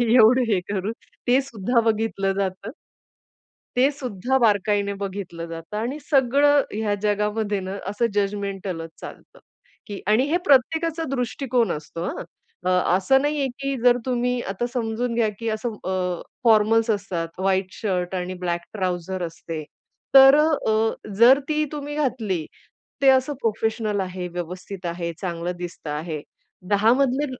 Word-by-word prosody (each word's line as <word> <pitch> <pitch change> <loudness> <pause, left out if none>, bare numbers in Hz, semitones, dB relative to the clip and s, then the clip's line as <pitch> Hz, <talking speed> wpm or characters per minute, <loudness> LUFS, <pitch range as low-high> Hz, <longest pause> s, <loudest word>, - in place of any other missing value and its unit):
एवढं 250 +2 +7
हे 185 - +2
करून 200 +2 -1 0.4
ते 255 +3 +5
सुद्धा 235 -2 0
बघितलं 210 -3 0
जातं. 195 +3 -3 1.1
ते 265 +3 +5
सुद्धा 255 -2 -1
बारकाईने 205 -2 +2
बघितलं 190 -4 -5
जातं, 165 +5 -7
आणि 245 +7 -2
सगळं 285 +1 +4
ह्या 210 -1 0
जगामध्ये 210 0 0
न, 190 +1 -5
असं 210 +4 0
जजमेंटलच 195 -4 -2
चालतं - - -11 0.5
की 205 -1 -6
आणि 215 +5 +4
हे 345 - +3
प्रत्येकाचा 320 +4 +3
दृष्टिकोन 245 -3 0
असतो, 155 +2 -5
हां. - - -4 0.4
अ, - - +2 0.3
असं 265 +8 +3
नाहीये, 290 -2 0
की 275 0 -2
जर 245 0 +6
तुम्ही 250 -1 0
आता 220 +5 -2
समजून 235 0 -2
घ्या 225 -2 +2
की 230 -1 -2
असं 225 +1 -4
अ, 180 -2 -1 0.2
फॉर्मल्स 225 0 +4
असतात, 185 -5 -2
व्हाईट 190 0 +1
शर्ट 185 -3 -2
आणि 180 0 -3
ब्लॅक 175 0 -1
ट्राउझर 185 -2 -2
असते. 165 -1 -7 0.5
तर 270 +1 +10
अ, 305 - +5 0.2
अ, 220 +1 +2 0.2
जर 245 +5 +7
ती 305 0 +1
तुम्ही 295 0 -5
घातली, 225 - -1 0.6
ते 270 - +6
असं 265 +2 +3
प्रोफेशनल 220 -1 0
आहे, 185 -1 -4
व्यवस्थित 180 +2 -7
आहे, 170 0 -3
चांगलं 175 -1 -3
दिसतं 175 -3 -7
आहे. 155 0 -4 0.5
10 210 +3 +4
मधले, 275 +1 +1
210 Hz, 140 wpm, -23 LUFS, 185-250 Hz, 1.1 s, तर